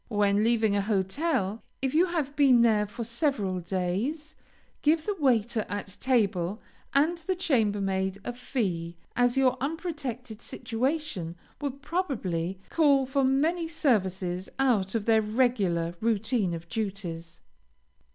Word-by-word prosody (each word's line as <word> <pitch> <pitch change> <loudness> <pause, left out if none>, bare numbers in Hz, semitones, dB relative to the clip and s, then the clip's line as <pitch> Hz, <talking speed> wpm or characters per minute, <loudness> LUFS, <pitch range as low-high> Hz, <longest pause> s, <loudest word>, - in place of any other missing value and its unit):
When 205 -1 +2
leaving 225 -3 +3
a 200 - +2
hotel, 210 - 0 0.2
if 265 0 -1
you 340 +4 +4
have 305 -5 -2
been 265 -5 +6
there 215 -3 +3
for 235 +3 -6
several 230 - -1
days, 195 - -2 0.5
give 310 +1 +3
the 415 - -1
waiter 235 -5 +2
at 205 -1 -5
table, 210 -6 +1 0.3
and 315 +5 +2
the 370 +3 -2
chambermaid, 200 - +1
a 245 - -3
fee, 180 -10 -3 0.2
as 245 +1 +2
your 260 -1 +3
unprotected 270 - -4
situation 250 - -3 0.3
will 285 - 0
probably 255 - -2
call 280 -4 +4
for 270 +1 +1
many 315 +6 +2
services 190 - 0
out 230 -7 +2
of 215 -2 -1
their 225 -1 +4
regular 210 -7 +1
routine 220 -4 +1
of 165 +1 -9
duties. 185 -6 -5
230 Hz, 130 wpm, -28 LUFS, 195-275 Hz, 0.5 s, been